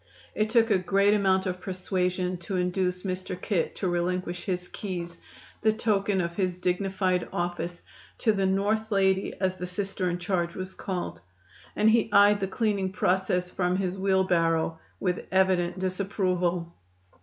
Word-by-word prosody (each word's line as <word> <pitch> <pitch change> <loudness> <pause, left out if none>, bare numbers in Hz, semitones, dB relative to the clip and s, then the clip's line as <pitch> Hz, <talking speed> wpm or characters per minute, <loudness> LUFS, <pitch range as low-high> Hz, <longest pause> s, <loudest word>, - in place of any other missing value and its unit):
It 215 0 0
took 225 -1 +3
a 195 - +4
great 200 +2 +3
amount 190 -2 +2
of 180 -1 -3
persuasion 185 -1 -1
to 175 +3 -5
induce 180 0 0
"Mr. 185 -1 -4
Kit" 185 -3 -1
to 190 - -2
relinquish 175 0 -1
his 180 -2 -2
keys, 175 -4 -5 0.5
the 220 - +4
token 205 -3 +1
of 170 0 -3
his 185 -3 0
dignified 185 0 0
office, 175 0 -3 0.3
to 225 - +3
the 195 -2 +1
"North 210 +3 0
lady," 190 -1 +2
as 185 -1 0
the 180 - -4
Sister 190 0 -2
in 175 - -1
charge 175 -1 -1
was 185 0 -5
called, 185 -2 -4 0.5
and 210 - +3
he 225 -1 +2
eyed 205 0 +6
the 195 - -1
cleaning 200 -2 0
process 180 -2 +1
from 180 -1 0
his 185 -1 -1
wheelbarrow 175 -4 +1 0.2
with 180 -2 -2
evident 185 -2 +2
disapproval. 185 -2 -1
185 Hz, 155 wpm, -27 LUFS, 180-195 Hz, 0.5 s, eyed